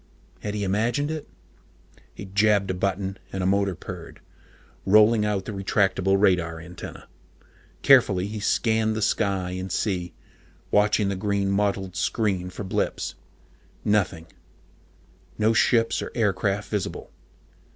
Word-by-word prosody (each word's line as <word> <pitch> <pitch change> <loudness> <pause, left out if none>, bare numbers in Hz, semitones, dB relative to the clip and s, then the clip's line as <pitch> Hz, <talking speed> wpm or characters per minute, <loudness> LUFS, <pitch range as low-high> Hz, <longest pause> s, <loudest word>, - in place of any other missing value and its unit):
Had 105 0 -4
he 105 - -2
imagined 120 +10 0
it? 155 -2 -5 0.9
He 100 - -8
jabbed 100 0 +2
a - - -1
button, 95 +1 -2
and 95 -1 -3
a - - 0
motor 100 0 +1
purred, - - -9 0.6
rolling 105 +2 +5
out 100 -3 -1
the - - -5
retractable 95 -1 +1
radar 85 -5 +2
antenna. 90 +1 -10 0.8
Carefully 95 -1 +5
he 105 +1 -5
scanned 110 +1 +1
the 110 - -1
sky 100 -4 0
and 95 0 -5
sea, 90 -3 -2 0.6
watching 105 0 +3
the 100 - -1
green 100 0 0
mottled 100 -2 -1
screen 95 -1 -1
for 90 +3 -7
blips. 95 - -2 0.7
Nothing 95 -6 +1 1.1
no 110 +1 +3
ships 115 0 +2
or - - -5
aircraft 100 -2 0
visible. 105 -3 -3
100 Hz, 130 wpm, -25 LUFS, 95-105 Hz, 1.1 s, rolling